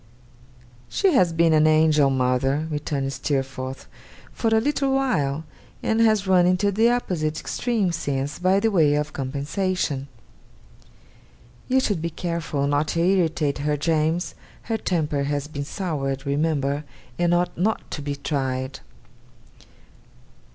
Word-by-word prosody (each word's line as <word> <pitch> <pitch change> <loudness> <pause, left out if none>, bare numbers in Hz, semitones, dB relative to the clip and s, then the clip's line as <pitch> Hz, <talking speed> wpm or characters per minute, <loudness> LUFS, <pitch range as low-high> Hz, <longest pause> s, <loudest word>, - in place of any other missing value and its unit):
'She 390 -3 +2
has 185 -10 +4
been 165 0 +3
an 155 0 +5
angel, 155 -2 +4
mother,' 135 +3 +1
returned 140 -2 -2
Steerforth, 135 -1 -3 0.5
'for 230 - -2
a 225 0 +4
little 275 +2 0
while; 160 - 0 0.4
and 225 +1 +1
has 215 -3 +3
run 180 -2 +4
into 185 +3 +2
the 220 +4 +3
opposite 160 -10 -1
extreme, 215 +1 -1
since, 145 -4 -3
by 185 +2 +3
way 170 -10 +3
of 150 +1 -2
compensation.' 145 +2 -2 1.6
'You 260 +1 +3
should 205 -10 0
be 170 - -2
careful 165 -4 -2
not 145 +2 +1
to 165 - -1
irritate 165 -5 +1
her, 150 +1 0
James. 160 +3 0 0.3
Her 225 -1 -1
temper 150 -7 -1
has 145 0 -2
been 145 -2 -5
soured, 140 -6 -3
remember, 145 0 0 0.4
and 175 0 +2
ought 175 0 +1
not 210 +6 -1
to 150 - -4
be 145 0 -3
tried. 135 -2 -3
155 Hz, 130 wpm, -23 LUFS, 140-185 Hz, 1.6 s, an